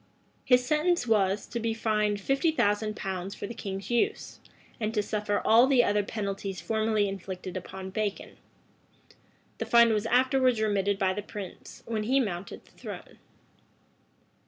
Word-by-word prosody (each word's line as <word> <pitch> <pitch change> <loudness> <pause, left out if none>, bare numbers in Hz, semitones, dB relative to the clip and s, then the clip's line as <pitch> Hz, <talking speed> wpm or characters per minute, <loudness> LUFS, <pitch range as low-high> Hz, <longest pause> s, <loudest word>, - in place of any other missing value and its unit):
His 250 -1 +4
sentence 305 +2 +1
was, 205 -3 +2
to 235 - -4
be 225 0 -1
fined 210 -2 0
fifty 275 - +1
thousand 215 -6 +1
pounds 190 -1 -4
for - - -6
the 235 - -6
king's 195 -1 -6
use, 400 - -1 0.4
and 215 -1 -1
to 210 - +2
suffer 205 0 -1
all 230 +4 +6
the 260 -3 +5
other 205 -1 +2
penalties 200 -2 -4
formerly 220 -2 +1
inflicted 190 -1 -6
upon 190 +1 -7
Bacon. 210 0 -3 1.2
The - - -3
fine 235 -1 +6
was 215 +1 0
afterwards 255 0 +3
remitted 200 -2 +1
by 190 -1 +1
the 205 - -4
prince, 205 -3 -9
when 220 -2 -2
he 265 +4 +3
mounted 195 -6 -4
the - - -22
throne. - - -10
215 Hz, 155 wpm, -28 LUFS, 195-235 Hz, 1.2 s, all